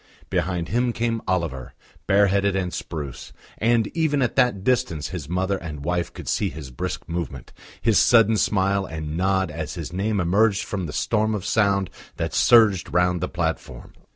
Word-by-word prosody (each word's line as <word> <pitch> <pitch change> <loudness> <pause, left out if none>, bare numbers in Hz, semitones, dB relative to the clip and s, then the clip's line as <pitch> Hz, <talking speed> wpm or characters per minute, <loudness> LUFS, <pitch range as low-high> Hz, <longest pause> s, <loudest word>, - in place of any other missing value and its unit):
Behind 90 -3 -1
him 120 +1 +1
came 115 -1 -1
Oliver, 85 -9 -2 0.3
bareheaded 100 0 +3
and 90 -2 -2
spruce, 75 -6 -6 0.3
and 115 0 +3
even 150 -4 +1
at 120 - -1
that 125 -8 +2
distance 85 - 0
his 80 -6 -6
mother 95 +2 0
and 75 -4 -7
wife 90 0 -1
could - - -10
see - - 0
his 70 -3 -9
brisk 60 - -5
movement, 85 -6 -5 0.3
his 115 -2 +3
sudden 115 -2 +5
smile 100 -1 +1
and 80 -1 -5
nod 95 +1 +1
as 80 -1 -5
his 85 -1 -6
name 100 +3 0
emerged 100 +4 +2
from 95 -5 -4
the - - -6
storm 110 +5 0
of 100 -2 -5
sound 100 -3 +1 0.3
that - - -3
surged 110 -6 +4
round 90 0 +2
the 90 - -2
platform. 80 -7 -4
95 Hz, 170 wpm, -23 LUFS, 85-110 Hz, 0.3 s, sudden